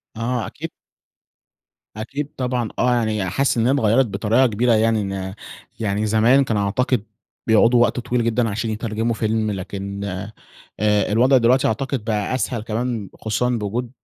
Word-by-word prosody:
آه 115 +1 -2
أكيد - - -7 1.2
أكيد 135 +7 -5
طبعًا 125 -3 -1
آه، 125 - +3
يعني 110 -4 0
حاسس 135 +8 +1
إن 115 - +2
هي - - +4
اتغيرت 130 -1 +3
بطريقة 110 +5 +2
كبيرة، 115 +2 +1
يعني 110 0 +2
إن 95 -1 -4 0.5
يعني 105 -1 -1
زمان 110 +6 +4
كان 115 -5 -1
أعتقد 110 +4 0 0.4
بيقعدوا 115 +2 +5
وقت 120 - +2
طويل 120 0 -1
جدًا 115 0 +1
عشان 110 +2 -2
يترجموا 110 +1 -2
فيلم، 110 -1 0
لكن 100 +1 -5 0.8
آآ 105 -1 +2
الوضع 125 +5 +4
دلوقتي 125 +2 +4
أعتقد 130 +1 -2
بقى 105 +1 -1
أسهل 125 -3 -2
كمان 115 -1 -3
خصوصًا 120 +3 -1
بوجود 115 +1 -2
115 Hz, 150 wpm, -21 LUFS, 105-125 Hz, 1.2 s, بيقعدوا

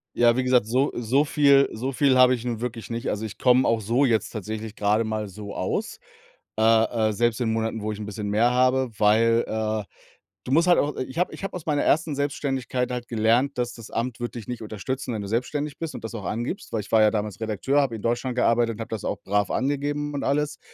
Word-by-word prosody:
Ja, 120 -1 +4
wie 130 - +1
gesagt, 125 -3 +3
so 130 +5 +1
so 120 +5 +2
viel 140 -2 +4
so 125 +5 -3
viel 135 -1 +3
habe 130 0 +6
ich 120 -2 -3
nun 120 -3 -3
wirklich 120 -2 -5
nicht. 115 +2 -3
Also, 105 +2 -2
ich 110 - -8
komme 125 0 +4
auch 115 -1 +2
so 115 +6 +2
jetzt 115 -4 +1
tatsächlich 110 0 -6
grade 105 +2 +2
mal 110 -1 -3
so 100 +1 -8
aus. - - -3 0.6
Äh, 110 0 +5 0.3
äh, 110 - -2
selbst 120 +1 +1
in 110 -2 +1
Monaten, 110 0 -2
wo 105 +1 -2
ich 105 - -6
'n 105 - -5
bisschen 105 0 -5
mehr 110 +4 +3
habe, 130 0 +2
weil, 115 +2 +4
äh 110 -1 -2 0.6
du - - -3
musst 165 +5 +4
halt 175 - +5
auch 145 +1 0
ich 130 +3 -5
habe 180 - 0
ich - - -9
habe 195 - -4
aus 180 - -7
meiner 150 -2 +1
1. 155 -1 +2
Selbstständigkeit 135 -3 -2
halt 125 -1 -4
gelernt, 120 +5 +1
das 120 -1 -1
das 115 -3 -11
Amt 120 +1 -3
wird 120 0 -5
dich 115 - -7
nicht 125 -2 -5
unterstützen, 115 +4 -4
wenn 110 - -3
du 100 - -6
selbstständig 140 +6 -2
bist 165 -2 -5
und - - -8
das 115 - -6
auch 105 -5 -6
angibst, 120 - -4
weil 110 - 0
ich 100 - -13
war 110 - +5
ja 105 0 +5
damals 105 -2 -3
Redakteur, 110 +6 0
habe 130 -5 -1
in 110 - -7
Deutschland 120 +2 -1
gearbeitet 115 -2 +2
und - - -14
habe 115 - -6
das 110 -3 -5
auch - - -2
brav 100 0 0
angegeben 145 +2 -1
und 140 - -3
alles. 150 +2 0
120 Hz, 245 wpm, -24 LUFS, 110-135 Hz, 0.6 s, habe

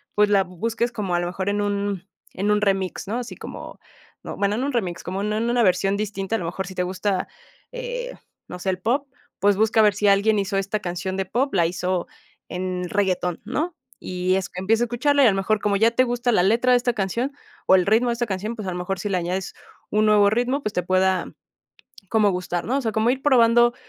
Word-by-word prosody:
pues, 210 0 +4
la 200 -2 +4
bu 180 -1 -15
busques 230 +4 -1
como, 200 -6 -2
a 175 - +2
lo 175 - -2
mejor, 190 +2 -3
en 205 0 0
un 200 -2 -2 0.3
en 200 +3 -1
un 210 0 +2
remix, 195 -2 -1
¿no?, 225 - -2
así 245 -1 -6
como, - - -9 0.4
no, - - -6
bueno, 200 +1 +1
no 255 - -1
en - - 0
un 285 - -3
remix, 180 -7 -2
como 190 +2 -4
en 210 +1 -1
en 230 +2 0
una 240 0 +2
versión 195 +1 +2
distinta, 205 0 -2
a - - -1
lo 170 - -4
mejor 185 +3 -4
si 190 - -8
te 180 - -1
gusta, 185 +1 -1 0.4
eh, - - -5 0.3
no 180 - -7
sé, 190 - -2
eh, - - +4
el 180 - -6
pop, 260 +8 0 0.3
pues 205 +1 +3
busca 220 +1 +3
ver 210 - +5
si 205 +2 0
alguien 205 +2 +4
hizo 195 0 -1
esta 195 +2 -1
canción 180 0 -4
de 195 - -1
pop, 255 +8 -1
la 175 -4 +3
hizo 180 0 -2 0.4
en 180 0 -3
reggaetón, 180 -3 0
¿no? 310 +9 -2 0.2
Y 185 0 -1
es 190 -1 -2
empieza 220 +6 +1
a - - +2
escucharla 280 +4 +2
y - - +7
a - - +7
lo 195 - -1
mejor 210 +2 +1
como 205 -1 +1
ya 225 +3 +4
te 245 +2 +3
gusta 245 0 0
la 215 - +4
letra 235 +6 +3
de 250 - +6
esta 245 0 0
canción 230 +6 -1 0.4
o 190 - +7
el 185 -1 +3
ritmo 225 +4 +3
de - - +1
esta 240 +1 -1
canción, 210 +3 -3
pues, 215 -4 -6
a 185 - -1
lo 180 - -4
mejor, 180 +2 -3
si 205 - -3
le 185 - +1
añades 180 +2 -3 0.4
un 215 +1 +3
nuevo 205 -1 +5
ritmo, 245 +5 0
pues, 210 - -3
te 180 - 0
pueda 185 0 +1 0.8
como 215 -2 +3
gustar, 180 -1 -3
¿no? 260 +4 0
O - - -1
sea, 225 - 0
como 220 +3 +2
ir 265 +1 -2
probando 240 -3 +5
205 Hz, 250 wpm, -23 LUFS, 185-235 Hz, 0.8 s, y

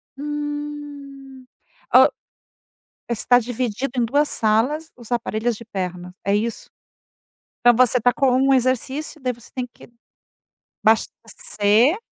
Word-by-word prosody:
Hum, 290 -2 -7 0.5
o - - +8 1.0
está 240 +1 +3
dividido 245 +1 -3
em 240 - +2
2 285 +6 +2
salas 245 +9 +1
os 240 -1 -14
aparelhos 235 -1 -1
de 230 - -11
perna, 180 -4 -5
é 200 - +2
isso? 225 +2 -3 0.9
Então, 240 0 +6
você 250 0 +4
tá 245 +3 +4
com 270 -3 +2
um 270 +1 +3
exercício, 260 +4 -1
daí 255 -1 0
você 235 -1 -14
tem 255 -1 -3
que - - -16 1.0
abastecer 225 - +2
250 Hz, 120 wpm, -21 LUFS, 225-280 Hz, 1.0 s, o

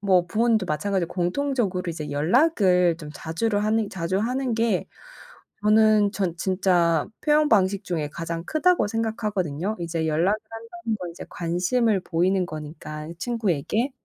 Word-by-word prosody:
뭐 185 -3 +3
부모님도 220 +1 +1
마찬가지로 185 +2 -1
공통적으로 185 -1 -1
이제 155 -2 -6
연락을 180 - +3
좀 150 -2 -8
자주를 205 +6 -1
하는 215 -1 +1
자주 185 0 -2
하는 250 +4 -1
게 225 -4 0 0.8
저는 215 -1 +4
전 190 -6 -1
진짜 175 -4 +2
표현 300 0 +3
방식 200 -2 +2
중에 160 -5 -2
가장 165 +2 -5
크다고 350 - +2
생각하거든요. 210 -5 -2
이제 165 -1 -2
연락을 165 +7 +2
한다는 230 0 -5
건 180 -2 -6
이제 170 - -9
관심을 190 +6 +1
보이는 180 +2 +1
거니까 155 0 -7
친구에게. 225 - -1
190 Hz, 330 characters per minute, -24 LUFS, 170-225 Hz, 0.8 s, 저는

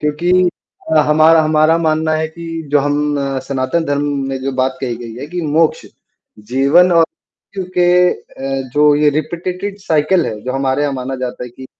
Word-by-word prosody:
क्योंकि 175 +5 +2 0.6
हमारा 155 +2 +5
हमारा 155 +1 +3
मानना 155 -1 0
है 160 0 -1
कि 170 +1 -10 0.3
जो 145 - +5
हम 145 +1 0
अ, 135 -1 -2
सनातन 135 +5 -2
धर्म 145 -1 -1 0.3
में 135 0 -3
जो 135 +1 -2
बात 130 0 -1
कही 120 -3 -3
गई 115 -1 -9
है 130 - -7
कि 175 +3 -5
मोक्ष, 155 +1 +1 0.5
जीवन 135 +11 +3
और 165 -1 +5 0.5
क्योंकि 185 -2 -2 0.3
अ, 135 -1 -6
जो 150 0 +5
ये 150 0 +3
रिपीटेटेड 180 +6 -4
साइकिल 160 +1 +1
है। 105 -1 -5
जो 130 - -3
हमारे 135 +1 0
यहाँ 145 -1 0
माना 130 +1 -4
जाता 125 -1 -5
है 125 - -10
कि 130 +2 -12
150 Hz, 180 wpm, -16 LUFS, 135-165 Hz, 0.6 s, हमारा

